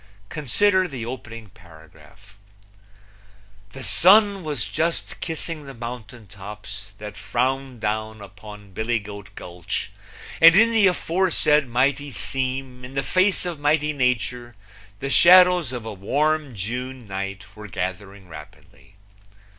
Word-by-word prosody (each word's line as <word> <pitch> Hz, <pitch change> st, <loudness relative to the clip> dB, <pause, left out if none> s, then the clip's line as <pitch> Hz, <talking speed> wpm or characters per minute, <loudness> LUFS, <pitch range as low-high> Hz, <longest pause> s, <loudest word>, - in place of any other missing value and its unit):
Consider 185 Hz, +7 st, +2 dB
the 130 Hz, -8 st, -6 dB
opening 115 Hz, -3 st, -8 dB
paragraph: 85 Hz, +5 st, -18 dB, 1.3 s
The 135 Hz, -, -8 dB
sun 200 Hz, +3 st, +5 dB
was 145 Hz, -8 st, -2 dB
just 160 Hz, -, -2 dB
kissing 160 Hz, -2 st, -5 dB
the 135 Hz, -, -9 dB
mountain 120 Hz, -1 st, -8 dB
tops 105 Hz, +1 st, -10 dB
that 105 Hz, -1 st, -8 dB
frowned 125 Hz, +4 st, -2 dB
down 110 Hz, 0 st, -3 dB
upon 105 Hz, 0 st, -12 dB
Billy 110 Hz, +5 st, -1 dB
Goat 100 Hz, -2 st, -9 dB
Gulch, 85 Hz, -1 st, -5 dB, 0.5 s
and 165 Hz, +1 st, +9 dB
in 225 Hz, +3 st, +6 dB
the 220 Hz, -3 st, +5 dB
aforesaid 165 Hz, -5 st, +2 dB
mighty 135 Hz, +4 st, 0 dB
seam 130 Hz, +1 st, -3 dB
in 130 Hz, +2 st, -10 dB
the 135 Hz, -, 0 dB
face 185 Hz, +3 st, +2 dB
of 170 Hz, -4 st, -4 dB
mighty 150 Hz, +1 st, +1 dB
Nature 125 Hz, -2 st, -1 dB, 0.4 s
the 135 Hz, +3 st, -4 dB
shadows 180 Hz, -4 st, +6 dB
of 120 Hz, -3 st, -6 dB
a 110 Hz, -, -5 dB
Warm 145 Hz, +7 st, -1 dB
June 125 Hz, +4 st, -5 dB
night 100 Hz, +1 st, -6 dB
were 105 Hz, 0 st, -9 dB
gathering 95 Hz, +1 st, -5 dB
rapidly. 80 Hz, +4 st, -14 dB
125 Hz, 125 wpm, -23 LUFS, 105-150 Hz, 1.3 s, and